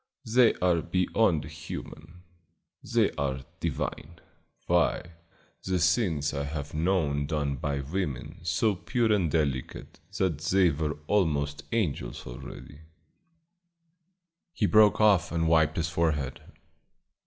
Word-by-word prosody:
They 120 +1 +4
are 90 -2 +2
beyond 90 -2 +1
human; 80 +2 -9 0.6
they - - +2
are 65 -2 -1 0.2
divine. 80 +3 -4 0.5
Why, 85 0 +1 0.5
the 95 -1 0
things 80 -4 +1
I 70 -1 -2
have 70 0 -5
known 75 -4 0
done 70 -2 -1
by 70 +1 -2
women 75 -2 -4
so 90 +6 +1
pure 115 +4 0
and 95 -6 +1
delicate 70 -4 -2 0.2
that 85 -6 0
they 90 +2 +3
were 75 0 -2
almost 75 -7 0
angels 105 -11 -2
already 70 +4 -10 0.9
" 170 0 -51
He 105 - +1
broke 105 0 +5
off 105 -4 +4
and 85 -1 0
wiped 80 -1 +3
his 85 0 0
forehead. 75 -6 -1
85 Hz, 120 wpm, -28 LUFS, 75-95 Hz, 0.9 s, broke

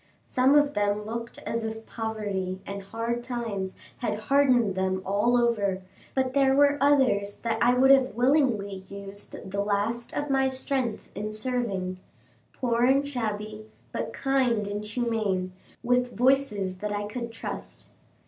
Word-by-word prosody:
Some 260 +3 +3
of 290 0 +4
them 205 0 0
looked 230 +1 -5
as 230 0 -2
if 225 0 -5
poverty 205 -5 -3
and 200 0 -5
hard 230 +4 -3
times 225 -6 -3 0.2
had 215 -4 -1
hardened 245 -3 +3
them 190 0 -1
all 205 +5 +2
over; 205 -6 +1 0.3
but 260 -1 +1
there 270 -1 +4
were 285 0 +4
others 255 -8 +3
that 230 -1 -1
I 245 +1 +5
would 265 +2 +6
have 265 -4 +4
willingly 245 -6 +2
used 200 -1 -7
the 200 +1 0
last 210 +4 -1
of 290 -1 -2
my 270 0 +3
strength 260 -3 -2
in 210 +1 -4
serving; 215 -5 -2 0.5
poor 240 -2 0
and 275 +3 +4
shabby, 215 -4 -4 0.2
but - - -3
kind 255 -6 +1
and 205 +1 -3
humane, 210 -5 -1 0.3
with 245 0 +1
voices 245 -7 +2
that 210 +1 -3
I 205 0 -2
could 235 +2 -5
trust. 225 - -7
230 Hz, 150 wpm, -27 LUFS, 205-255 Hz, 0.5 s, would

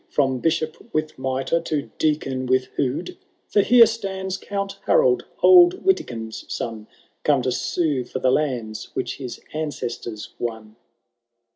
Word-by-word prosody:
From 135 -3 +1
Bishop 155 +1 -2
with 155 -3 -2
mitre 135 +5 0
to 155 -3 -3
Deacon 135 -4 0
with 130 0 +2
hood! 140 - -2 0.3
For 205 - +4
here 235 +3 +7
stands 190 -4 -3
Count 200 0 -4
Harold, 485 -6 +4 0.2
old 360 0 +7
Witikind's 115 - -1
son. 110 -2 -4 0.3
Come 140 -4 +2
to 130 - 0
sue 145 0 0
for 125 - -6
the 130 - +2
lands 120 -8 -1
which - - -3
his 130 -4 -7
ancestors 120 -7 -4
won. 110 -2 -5
145 Hz, 135 wpm, -23 LUFS, 125-190 Hz, 0.3 s, here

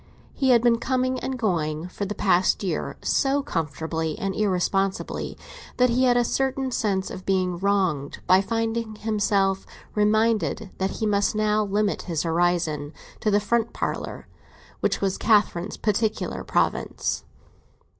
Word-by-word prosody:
He 265 - +1
had 240 -2 +5
been 235 -1 +4
coming 255 +1 0
and 265 -1 -3
going, 165 -7 -1
for 200 - -4
the 210 +2 -4
past 185 +1 +2
year, 175 -5 -2
so 275 +1 +2
comfortably 160 - -3
and 195 0 -2
irresponsibly, 195 -1 -1 0.4
that 250 -1 +4
he 255 +2 +3
had 245 -1 +4
a 245 - +4
certain 265 +1 0
sense 195 -5 -1
of 185 - -7
being 185 -2 0
wronged 185 -8 0
by 185 +1 +5
finding 225 +1 -2
himself 205 -3 +1 0.3
reminded 215 -3 +1
that 190 0 +1
he 220 - -3
must 205 0 +1
now 215 0 +2
limit 205 0 0
his 165 -3 0
horizon 165 -3 0 0.3
to 215 - 0
the 205 0 +4
front 230 +2 0
parlour, - - -4 0.5
which - - 0
was 195 -1 0
Catherine's 205 -4 +2
particular 215 +1 -1
province. - - -1
205 Hz, 145 wpm, -25 LUFS, 180-225 Hz, 0.5 s, had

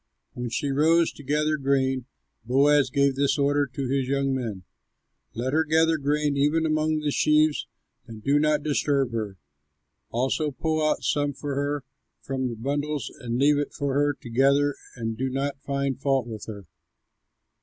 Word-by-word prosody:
When 120 -1 -4
she 140 +4 -1
rose 160 +4 +3
to - - -13
gather 150 +2 +1
grain, 135 -2 0 0.4
Boaz 140 +3 +4
gave 140 +1 +2
this 140 +2 +1
order 145 0 +2
to 130 +1 -4
his 135 0 0
young 135 0 0
men: 115 -8 -4 0.7
"Let 125 +4 -2
her 160 +1 +3
gather 160 +1 +3
grain 145 0 0
even 150 +3 +2
among 155 0 +1
the 150 -1 0
sheaves 155 +1 +2 0.4
and 110 -2 -10
do 145 +1 +3
not 150 -1 +2
disturb 140 -3 +1
her. 105 -4 -4 0.7
Also 135 +6 0
pull 155 +3 -1
out 155 0 +1
some 145 -1 0
for 145 +1 -5
her 145 0 -1 0.4
from 130 -1 -3
the 120 - -4
bundles 145 +5 -2
and 120 -2 -3
leave 145 +2 +4
it 145 - -3
for 140 -2 -2
her 145 +1 +2
to 120 - -9
gather 140 +3 +3 0.2
and 115 -2 -3
do 130 +1 0
not 135 +1 -3
find 140 -1 -2
fault 135 -3 +1
with 110 -3 -7
her." 100 -3 -8
140 Hz, 170 wpm, -25 LUFS, 130-150 Hz, 0.7 s, Boaz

